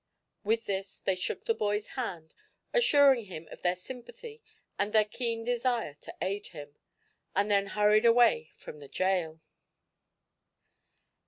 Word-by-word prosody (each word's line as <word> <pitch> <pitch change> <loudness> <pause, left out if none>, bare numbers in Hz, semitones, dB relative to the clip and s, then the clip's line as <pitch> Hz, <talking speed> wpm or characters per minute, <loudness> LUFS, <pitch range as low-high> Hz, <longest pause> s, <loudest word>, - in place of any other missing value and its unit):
With 225 +2 0
this 195 0 -3
they 190 - 0
shook 185 -1 -4
the 455 - +2
boy's 210 - -1
hand, 175 -11 -5 0.4
assuring 285 - +5
him 165 -4 -9
of - - -11
their 180 0 +1
sympathy 260 - -10 0.4
and 205 +1 0
their 215 -1 +5
keen 230 +1 -3
desire 240 - 0
to - - -10
aid 200 +2 -3
him, 145 -3 -11 0.6
and 205 +2 +1
then 200 -1 +3
hurried 210 +2 +3
away 230 -9 +4
from 150 - -11
the 140 - -11
jail. 180 -4 -1
210 Hz, 140 wpm, -30 LUFS, 185-235 Hz, 0.6 s, assuring